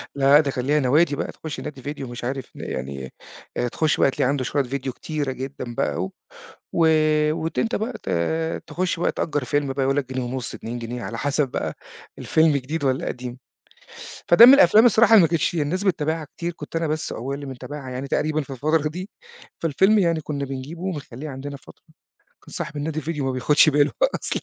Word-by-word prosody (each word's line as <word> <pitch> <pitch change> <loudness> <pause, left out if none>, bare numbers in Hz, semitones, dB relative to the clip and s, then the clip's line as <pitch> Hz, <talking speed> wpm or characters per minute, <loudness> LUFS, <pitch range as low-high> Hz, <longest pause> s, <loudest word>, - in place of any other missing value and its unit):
لا، 140 0 +4
لأ، 150 - +9
ده 140 -3 +1
كان 125 -1 -3
ليها 150 +2 +3
نوادي 145 +3 +3
بقى - - -3
تخش 160 -2 -7
نادي 145 -3 -7
فيديو 140 -1 -5
مش 120 0 -8
عارف 130 +1 -4
يعني 65 0 -6 0.4
آآ، 120 - 0
تخش 155 +5 0
بقى 135 - +4
تلاقي 125 - 0
عنده 140 -2 0
شوية 140 +2 0
فيديو 130 0 -4
كتيرة 150 -3 -3
جدًا 130 -2 -6
بقى، - - -1
و 95 - -4 0.6
و 165 -1 +3 0.5
وت 160 +1 -3
أنت 230 - 0
بقى 225 +4 -2
ت - - -4 0.6
تخش 180 -2 -2
بقى - - +1
تأجر 145 -4 -2
فيلم 145 +1 0
بقى 135 0 -2
يقول 135 +1 +1
لك 130 -2 -2
جنيه 130 - -2
ونص 125 0 -4
2 120 +2 -6
جنيه 120 +1 -5
على 115 - -5
حسب 145 -1 0
بقى - - -3 0.4
الفيلم 160 -1 +3
جديد 145 +3 -2
والّا 130 -1 0
قديم، 125 0 -5 0.9
فده 225 +7 +9
من 260 - +10
الأفلام 245 -5 +7
الصراحة 225 0 +5
اللي 210 - +9
ما 165 - +5
كانتش 165 +1 0
الناس 165 +6 -1
بتابعها 160 -4 0
كتير 170 0 -2
كنت 165 - -10
أنا 165 -1 0
بس 155 +1 -2
وأبويا 135 +4 -4
اللي 140 0 -7
بنتابعها 135 +1 -7
يعني 130 +2 -4
تقريبًا 155 +2 0
في 140 - -11
الفترة 150 +3 +1
دي، 185 +6 -7 0.5
فالفيلم 190 +7 +3
يعني 165 -3 +1
كنا 145 -1 -3
بنجيبه 135 +6 -7
وبنخلّيه 150 -6 -5
عندنا 140 +1 -6
فترة، - - -18 0.6
كان - - -14
صاحب 165 -3 -5
النادي 155 +1 -3
الفيديو 150 -2 -3
ما 130 - 0
بياخدش 145 +5 +4
باله 145 0 +3 0.2
أصلًا - - -3
145 Hz, 205 wpm, -23 LUFS, 130-160 Hz, 0.9 s, من